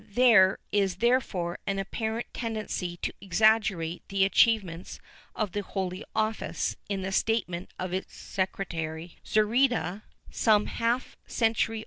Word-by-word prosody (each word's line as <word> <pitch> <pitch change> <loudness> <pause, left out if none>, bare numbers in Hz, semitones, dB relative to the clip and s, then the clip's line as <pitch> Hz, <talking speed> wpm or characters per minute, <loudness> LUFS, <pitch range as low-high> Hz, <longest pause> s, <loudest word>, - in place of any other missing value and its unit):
^ - - -22
There 220 -7 +6
is 195 -3 +1
therefore 195 -6 0
an 195 - 0
apparent 220 +4 -3
tendency 215 -6 -3
to - - -1
exaggerate 195 -3 +2
the 195 0 +3
achievements 195 -4 +2 0.4
of 210 -4 -1
the 205 - -2
Holy 190 -1 -4
Office 220 0 -1
in 195 -2 -2
the 190 - -3
statement 190 -4 0
of 185 -1 -4
its 190 - -4
secretary 170 -4 -4
Zurita, 215 -3 +2 0.3
some 210 -2 +3
^ - - -6
Pulgar, 235 +2 +2 0.3
Cronica, 225 -1 +2
P. 225 0 -5
200 Hz, 135 wpm, -28 LUFS, 185-225 Hz, 0.4 s, There